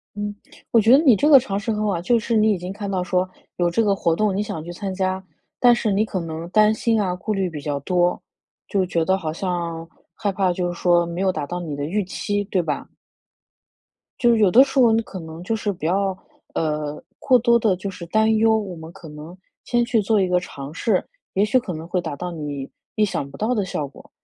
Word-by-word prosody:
嗯， 205 0 -4 0.4
我 230 - +5
觉 225 +4 +4
得 270 - +9
你 255 -7 +6
这 290 - +2
个 280 -3 +9
尝 200 -6 -3
试 210 +2 -2
很 210 0 -2
好 215 - 0
啊。 170 - -2
就 235 +6 +3
是 225 +1 -1
你 215 0 +4
已 200 - +1
经 180 +2 -6
看 200 0 -5
到 185 -2 0
说 180 0 0 0.3
有 175 -1 +1
这 200 +7 +2
个 205 -2 +2
活 170 -4 +1
动 210 +2 +1
你 205 - +1
想 160 -6 -5
去 175 - -8
参 190 +2 -5
加， 185 0 -1 0.4
但 245 -1 +6
是 230 -2 -1
你 200 +2 +2
可 195 -4 -3
能 165 0 -6
担 215 +2 +5
心 225 0 +1
啊， 185 -3 0
顾 200 +4 -3
虑 195 -3 0
比 155 -3 -7
较 145 -1 -2
多， 175 +3 +1 0.5
就 195 -3 +1
觉 170 -2 0
得 190 +3 +2
好 160 -5 -4
像 170 -2 -3 0.3
害 205 -3 -1
怕 190 -1 +1
就 175 0 -2
是 - - -7
说 175 -1 +3
没 170 +1 -5
有 190 -1 +2
达 150 -4 -4
到 175 +4 -4
你 160 -4 -5
的 145 - -3
预 205 +5 -1
期， 205 +2 -2
对 190 -1 0
吧？ 150 -3 -3 1.3
就 235 -2 +4
有 210 -4 +4
的 250 +8 +8
时 275 0 -3
候， 235 -3 +6
你 225 - +2
可 195 -3 -9
能 160 +1 -9
就 225 - -1
是 210 -1 -2
不 175 - -9
要， 190 +1 +1 0.4
呃， 150 -2 -2 0.2
过 255 -2 +4
多 235 0 +4
地 215 -5 +2
就 195 +2 -5
是 175 -2 -9
担 220 +4 +2
忧， 220 0 +4
我 195 -5 -4
们 160 0 -9
可 165 - -12
能 150 +4 -10 0.3
先 240 -1 +1
去 235 -1 +2
做 210 +1 +2
一 185 - +1
个 180 0 +3
尝 140 -5 -8
试， 185 +3 0 0.3
也 195 - +3
许 215 +5 +3
可 225 -7 -4
能 160 0 -7
会 180 +1 0
达 160 -4 -5
到 180 +4 -5
你 145 -4 -5 0.3
意 215 - +3
想 145 -8 -2
不 140 - -12
到 225 +4 0
的 210 -4 0
效 150 -5 -3
果。 140 - -16
190 Hz, 270 characters per minute, -22 LUFS, 170-215 Hz, 1.3 s, 得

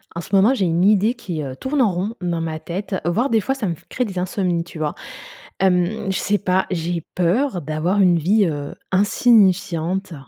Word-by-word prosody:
En 170 - -3
ce 200 - -2
moment, 205 +7 +5
j'ai 195 - 0
une 170 +1 +1
idée 210 +3 +4
qui, 175 -11 -5
heu, 130 -1 -6
tourne 275 - -1
en 220 -5 +3
rond 200 +6 -3
dans 170 -2 -2
ma 160 -1 -4
tête, 190 +4 -4
voire, 225 +11 +1
des 225 -2 +2
fois, 265 - -1
ça 225 -8 -3
me 170 - -2
f - - -23
crée 250 - -1
des 195 -4 -7
insomnies, 180 -2 -1
tu 165 -1 -11
vois? 150 -1 -2 0.6
Hem, 190 +2 +1
je 190 - -1
sais 205 0 +1
pas, 190 -1 +1
j'ai 170 -1 -2
peur 185 +4 +1
d'avoir 155 +6 -1
une 180 -3 +4
vie, 200 +6 +3
heu, 145 -2 -4 0.2
insignifiante, 190 -3 +2
185 Hz, 210 wpm, -21 LUFS, 170-205 Hz, 0.6 s, moment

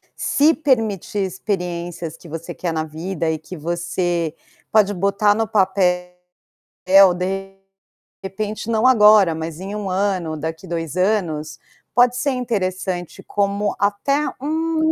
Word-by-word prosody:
se 300 +3 +3
permitir 225 - 0
experiências 175 -4 -3
que 170 - -14
você 165 +1 -6
quer 175 -2 -3
na 160 -1 -1
vida 160 +2 -3
e 160 - -3
que 170 +4 -10
você 170 0 -2 0.3
pode 205 -2 +3
botar 200 +2 +2
no 225 +1 -1
papel 185 -4 +1 1.1
de 195 +2 -3 0.7
repente, 210 +3 -4
não 225 +1 +1
agora, 210 -7 +6
mas 160 0 -5
em 195 +2 -6
1 205 -2 -4
ano, 185 -4 -1
daqui 160 +2 -5
2 165 -2 -4
anos, 170 -6 0 0.4
pode 245 0 +5
ser 280 +2 0
interessante 185 -8 -3
como, 200 0 -1
até 240 +9 +1
um 315 +2 0
190 Hz, 130 wpm, -20 LUFS, 170-215 Hz, 1.1 s, agora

